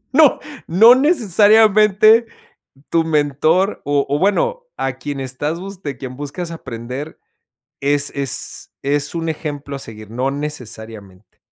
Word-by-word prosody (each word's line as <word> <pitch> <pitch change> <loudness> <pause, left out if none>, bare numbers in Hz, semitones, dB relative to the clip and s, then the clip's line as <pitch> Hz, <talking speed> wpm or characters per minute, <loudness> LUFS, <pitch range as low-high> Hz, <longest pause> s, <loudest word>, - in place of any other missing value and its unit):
No, 300 -2 +5 0.3
no 225 +9 +7
necesariamente 215 - +4 0.6
tu 165 -1 +1
mentor 155 +5 +1
o 145 -1 +1
o 145 +1 0
bueno, 485 - +1
a 135 -1 -3
quien 140 0 -5
estás 145 +6 -4
bus 195 -1 -9
de 140 -5 -5
quien 130 -1 -8
buscas 145 +4 -6
aprender 130 0 -7 0.6
es 145 0 +2
es 140 -3 -2
es 145 +3 -1
un 165 -1 -3
ejemplo 145 -3 -5
a - - -6
seguir, 110 -4 -10
no 130 +3 -1
necesariamente. 110 -9 -8
145 Hz, 130 wpm, -18 LUFS, 135-195 Hz, 0.6 s, no